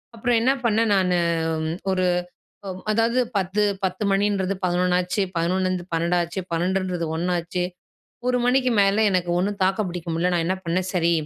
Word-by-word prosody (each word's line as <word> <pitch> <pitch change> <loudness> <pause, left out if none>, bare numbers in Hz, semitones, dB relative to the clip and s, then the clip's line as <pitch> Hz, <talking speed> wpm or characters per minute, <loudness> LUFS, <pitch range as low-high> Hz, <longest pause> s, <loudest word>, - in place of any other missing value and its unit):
அப்புறம் 235 +1 +1
என்ன 260 +3 +4
பண்ணேன் 225 -1 +2
நானு, 180 -2 +2 0.5
ம் 160 +2 -2
ஒரு 185 -1 +1 0.6
அ - - -4 0.2
அதாவது 230 +3 +2 0.2
10, 195 +2 0 0.2
10 185 +2 -2
மணின்றது 195 -1 +1
11 180 0 +2
ஆச்சு. 180 +3 -1
11லருந்து 185 +1 0
12 170 +2 +1
ஆச்சு. 170 +3 -3
12ன்றது 180 0 -1
1. 175 +1 -1 0.7
ஒரு 250 0 +2
மணிக்கு 255 0 +3
மேலே 200 +2 +3
எனக்கு 180 -2 0
ஒண்ணும் 200 +2 -1
தாக்கு 190 +3 +1
பிடிக்க 175 -1 -6
முடியல. 175 +2 +1
நான் 165 - +1
என்ன 185 - +1
பண்ணேன், 180 +2 0
சரி 170 -1 +2
185 Hz, 160 wpm, -23 LUFS, 175-205 Hz, 0.7 s, என்ன